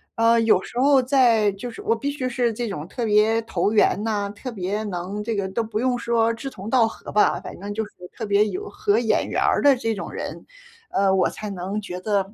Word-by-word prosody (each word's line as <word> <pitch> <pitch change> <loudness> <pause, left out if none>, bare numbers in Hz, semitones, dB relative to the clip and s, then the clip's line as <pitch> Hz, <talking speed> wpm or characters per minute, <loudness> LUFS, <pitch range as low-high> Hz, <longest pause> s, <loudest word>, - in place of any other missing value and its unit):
呃， 230 0 +4
有 225 -4 +4
时 240 - -6
候 275 0 +5
在 240 -6 +4
就 200 +5 -7
是 410 - -10
我 430 +2 +1
必 285 - -3
须 270 -3 -3
是 245 -1 0
这 235 +1 -3
种 155 -5 -5
特 235 +5 -4
别 215 +1 +3
投 200 -1 0
缘 210 -1 +3
呐， 205 -2 -1
特 255 +5 -7
别 205 0 -3
能 195 +1 -4
这 225 0 -2
个 200 -1 -1
都 225 +4 -1
不 215 -1 -3
用 250 +1 +1
说 230 -1 +1
志 270 +4 -6
同 200 -3 -8
道 240 -2 +4
合 225 - -9
吧， 210 - +3
反 - - -9
正 205 +1 -5
就 220 +1 -2
是 - - -16 0.2
特 225 - -5
别 205 0 +3
有 410 - -5
合 410 - +1
眼 225 -2 +1
缘 - - -1
儿 - - +2
的 285 -1 +6
这 225 -2 -1
种 195 - -6
人， - - -6 0.5
呃， 195 0 +2
我 190 - +3
才 210 -1 -7
能 195 +2 -4
觉 180 -2 -6
得， 200 0 -1
220 Hz, 260 characters per minute, -23 LUFS, 200-245 Hz, 0.5 s, 的